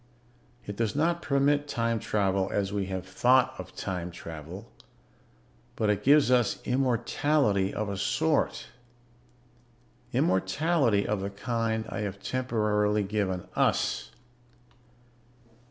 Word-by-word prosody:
"It 105 - -6
does 115 +2 -1
not 170 +3 +1
permit 145 0 +2
time 115 -4 0
travel 95 -2 0
as 100 0 -1
we 100 -2 -1
have 95 -1 -4
thought 125 +7 +3
of - - -9
time 90 -2 -4
travel, 85 +5 -9 1.0
but 105 -1 +1
it 105 0 -1
gives 145 0 +5
us 120 -3 +2
immortality 125 -4 +1
of 105 0 -3
a 100 - -3
sort. 155 +9 0 1.4
Immortality 125 - +2
of 105 -2 -1
the 100 - -3
kind 110 +2 -2
I 100 -1 -5
have 100 -2 -4
temporarily 105 -4 0
given 95 -3 -2
us. - - +1
105 Hz, 115 wpm, -28 LUFS, 100-130 Hz, 1.4 s, gives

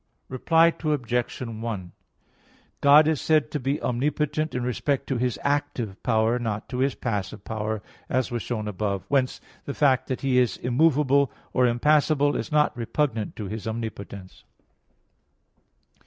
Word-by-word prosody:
Reply 165 +6 +3
Obj. 125 -6 -1
1: 110 -6 -5 0.9
God 145 +2 +7
is 160 -3 +1
said 155 -2 +2
to 150 - -2
be 135 +3 -1
omnipotent 150 +4 -1
in 125 - -1
respect 135 +3 -1
to 135 - -2
His 125 -1 -1
active 140 -8 -1
power, 115 0 +2
not 110 -3 -3
to 130 +2 +1
passive 100 -5 -3
power, 110 -1 -3 0.3
as 130 -2 0
was 120 -1 -2
shown 110 -3 -3
above 100 -1 -2
(A. - - -26
1). - - -32
Whence 135 -2 +1 0.2
the 140 - -5
fact 135 -3 +3
that 130 - -3
He 130 -2 +3
is 125 -2 +1
immovable 140 +1 +3 0.2
or 125 -1 +4
impassible 145 +3 +3
is 110 - -3
not 150 -1 +3
repugnant 115 -2 -2
to 105 - -5
His 110 +3 -5
omnipotence. 100 -4 -6
125 Hz, 150 wpm, -25 LUFS, 110-145 Hz, 0.9 s, God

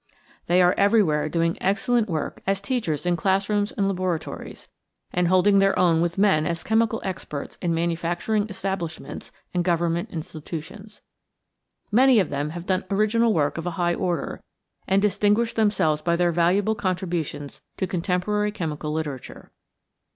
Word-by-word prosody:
They 180 +1 +4
are 180 - +5
everywhere 185 -8 +3
doing 165 +1 0
excellent 220 +3 +1
work 155 -3 -3
as 195 0 +1
teachers 200 - -2
in 175 0 +2
classrooms 200 +3 +1
and 200 -2 0
laboratories 185 -4 -4 0.5
and 180 0 +2
holding 185 +3 +4
their 195 0 +3
own 170 -3 +3
with 170 +1 -1
men 190 -7 +3
as 170 -1 -3
chemical 225 0 +1
experts 160 -6 -5
in 175 - 0
manufacturing 170 +6 -1
establishments 190 -4 -5 0.2
and 175 -1 +1
government 170 -1 0
institutions. 165 +6 -8 0.9
Many 255 +2 +6
of 185 - 0
them 145 +1 -2
have 170 +2 -7
done 185 -1 0
original 215 +3 +2
work 155 -3 0
of 165 - -5
a - - -1
high 175 -1 +1
order, 175 -3 -2 0.5
and 195 +1 +2
distinguished 210 +3 +2
themselves 190 -9 +2
by 170 +2 +1
their 175 0 +2
valuable 180 +6 +2
contributions 175 -7 -3 0.2
to - - 0
contemporary 190 +4 -1
chemical 155 -6 -4
literature. 150 -4 -5
180 Hz, 145 wpm, -24 LUFS, 165-205 Hz, 0.9 s, Many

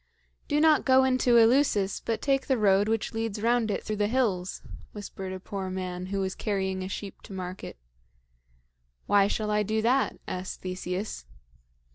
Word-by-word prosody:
"Do 295 - +1
not 310 -1 +5
go 265 0 +5
into 255 -2 +3
Eleusis, 230 -4 +3
but 225 - -2
take 270 -2 +1
the 265 - +2
road 200 -1 +3
which 225 0 -1
leads 225 -2 -2
round 230 0 +2
it 205 - -2
through 215 - -3
the 205 0 +2
hills," 205 -7 -1 0.3
whispered 195 -2 -7
a 185 - -5
poor 190 0 -5
man 185 -1 -4
who 195 0 -2
was 190 0 -2
carrying 190 -3 -2
a 185 - -4
sheep 200 0 -7
to 205 - -11
market. 185 - -6 1.3
"Why 200 -1 +4
shall 210 +1 -1
I 210 0 +2
do 215 +2 0
that?" 255 +4 +2
asked 185 0 -5
Theseus. 185 - -4
205 Hz, 170 wpm, -27 LUFS, 190-235 Hz, 1.3 s, not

